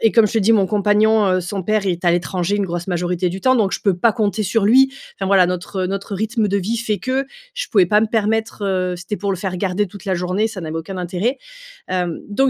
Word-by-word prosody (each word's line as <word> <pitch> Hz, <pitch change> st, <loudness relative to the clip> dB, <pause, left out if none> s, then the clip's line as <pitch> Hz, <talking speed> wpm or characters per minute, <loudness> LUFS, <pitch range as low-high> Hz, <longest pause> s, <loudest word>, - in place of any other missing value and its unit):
et 225 Hz, -, +3 dB
comme 225 Hz, -2 st, +5 dB
je -, -, -7 dB
te -, -, +4 dB
dit 220 Hz, +2 st, +3 dB
mon 200 Hz, -4 st, +3 dB
compagnon, 210 Hz, +1 st, +3 dB
heu, 185 Hz, -1 st, +2 dB
son 185 Hz, +1 st, -4 dB
père, 215 Hz, -1 st, +1 dB
est 180 Hz, -1 st, -2 dB
à 175 Hz, -, +4 dB
l'étranger 175 Hz, +2 st, -1 dB
une 200 Hz, -, 0 dB
grosse 175 Hz, -1 st, -4 dB
majorité 180 Hz, 0 st, -1 dB
du 190 Hz, +2 st, -5 dB
temps, 260 Hz, 0 st, +3 dB
donc 205 Hz, -4 st, +1 dB
je -, -, -2 dB
peux 195 Hz, -4 st, +1 dB
pas 220 Hz, +5 st, +3 dB
compter 215 Hz, -2 st, 0 dB
sur 210 Hz, +2 st, +1 dB
lui, 265 Hz, +5 st, +5 dB, 0.2 s
enfin 195 Hz, -, -3 dB
voilà. 190 Hz, -2 st, +5 dB
Notre 180 Hz, +1 st, -3 dB
notre 195 Hz, +2 st, -4 dB
rythme 220 Hz, +2 st, 0 dB
de 200 Hz, 0 st, 0 dB
vie 215 Hz, +5 st, -2 dB
fait 220 Hz, -3 st, -1 dB
que, 260 Hz, +1 st, -1 dB, 0.3 s
je -, -, -3 dB
pouvais 200 Hz, -8 st, +4 dB
pas 210 Hz, +4 st, +3 dB
me 225 Hz, -, +2 dB
permettre 220 Hz, 0 st, -1 dB
heu, 185 Hz, -2 st, 0 dB
si -, -, -10 dB
c'était 210 Hz, +4 st, -4 dB
pour 200 Hz, +1 st, -2 dB
le -, -, -2 dB
faire 185 Hz, 0 st, -3 dB
garder 195 Hz, +2 st, 0 dB
toute 195 Hz, -1 st, -12 dB
la 190 Hz, -, 0 dB
journée, 180 Hz, +4 st, 0 dB
ça 210 Hz, -4 st, -7 dB
n'avait 160 Hz, -1 st, -5 dB
aucun 165 Hz, +4 st, -5 dB
intérêt. 185 Hz, +9 st, -2 dB, 0.5 s
Hem, 180 Hz, -3 st, -2 dB
donc 265 Hz, +6 st, +2 dB
200 Hz, 265 wpm, -19 LUFS, 180-220 Hz, 0.5 s, comme